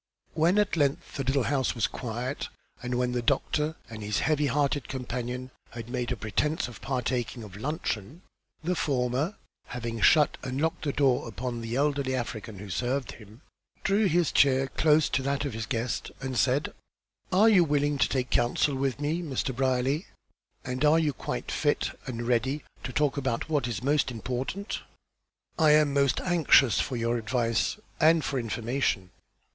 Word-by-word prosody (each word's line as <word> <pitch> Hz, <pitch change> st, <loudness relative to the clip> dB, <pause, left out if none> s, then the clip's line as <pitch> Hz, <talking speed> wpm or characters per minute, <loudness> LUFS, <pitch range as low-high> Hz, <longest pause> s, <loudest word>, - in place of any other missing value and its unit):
When 165 Hz, +5 st, +3 dB
at 210 Hz, -4 st, +2 dB
length 145 Hz, -3 st, 0 dB
the 140 Hz, -, -1 dB
little 135 Hz, +1 st, +1 dB
house 135 Hz, -1 st, 0 dB
was 115 Hz, -, +1 dB
quiet, 125 Hz, +3 st, -4 dB, 0.3 s
and 125 Hz, 0 st, -2 dB
when 125 Hz, 0 st, +1 dB
the 125 Hz, 0 st, -1 dB
doctor 150 Hz, +6 st, 0 dB
and 110 Hz, -2 st, -8 dB
his 105 Hz, 0 st, -1 dB
heavy 150 Hz, -2 st, +2 dB
hearted 140 Hz, -1 st, 0 dB
companion 125 Hz, 0 st, -4 dB, 0.2 s
had 115 Hz, 0 st, -8 dB
made 125 Hz, -1 st, -2 dB
a -, -, 0 dB
pretence 115 Hz, +10 st, -1 dB
of 120 Hz, -, -11 dB
partaking 125 Hz, -2 st, -2 dB
of 100 Hz, -3 st, -10 dB
luncheon, 140 Hz, -, -4 dB, 0.4 s
the 180 Hz, +3 st, +1 dB
former, 140 Hz, +3 st, 0 dB, 0.3 s
having 115 Hz, -2 st, -4 dB
shut 150 Hz, -3 st, +5 dB
and 130 Hz, +1 st, -3 dB
locked 160 Hz, +1 st, -1 dB
the 145 Hz, -, +1 dB
door 135 Hz, -4 st, +2 dB
upon 120 Hz, 0 st, -4 dB
the 115 Hz, +1 st, -4 dB
elderly 140 Hz, -1 st, +1 dB
African 115 Hz, -3 st, -5 dB
who 100 Hz, 0 st, -8 dB
served 125 Hz, +8 st, -1 dB
him, 110 Hz, +2 st, -14 dB, 0.4 s
drew 200 Hz, +2 st, +3 dB
his 170 Hz, -2 st, +2 dB
chair 135 Hz, -1 st, +4 dB
close 155 Hz, +1 st, +3 dB
to 135 Hz, -, +1 dB
that 140 Hz, +2 st, -1 dB
of 140 Hz, -, -3 dB
his 110 Hz, 0 st, -4 dB
guest, 115 Hz, 0 st, -2 dB
and 130 Hz, -1 st, -4 dB
said: 130 Hz, +4 st, +1 dB, 0.6 s
"Are 200 Hz, +4 st, +5 dB
you 200 Hz, -6 st, +6 dB
willing 145 Hz, -2 st, +1 dB
to -, -, +3 dB
take 130 Hz, -2 st, -1 dB
counsel 125 Hz, +4 st, +2 dB
with 135 Hz, 0 st, -1 dB
me, 155 Hz, +4 st, -1 dB
Mr. 135 Hz, -5 st, -2 dB
Brierly? 130 Hz, +5 st, 0 dB, 0.6 s
And 125 Hz, +2 st, -2 dB
are 150 Hz, +2 st, +6 dB
you 155 Hz, -3 st, +1 dB
quite -, -, -4 dB
fit -, -, +1 dB, 0.2 s
and 120 Hz, -2 st, -4 dB
ready 130 Hz, +4 st, +1 dB, 0.2 s
to 130 Hz, -, -4 dB
talk 145 Hz, +1 st, +1 dB
about 130 Hz, +1 st, -2 dB
what 145 Hz, -6 st, +1 dB
is 120 Hz, 0 st, -4 dB
most 145 Hz, +1 st, +2 dB
important?" 130 Hz, -, -4 dB, 0.8 s
"I 155 Hz, -2 st, +6 dB
am 150 Hz, -2 st, +4 dB
most 140 Hz, -2 st, +2 dB
anxious 160 Hz, -8 st, +4 dB
for 130 Hz, -, -1 dB
your 115 Hz, 0 st, 0 dB
advice, 115 Hz, -, 0 dB, 0.2 s
and 160 Hz, 0 st, +5 dB
for 135 Hz, -, -1 dB
information." 115 Hz, -4 st, -1 dB
130 Hz, 175 wpm, -28 LUFS, 120-150 Hz, 0.8 s, you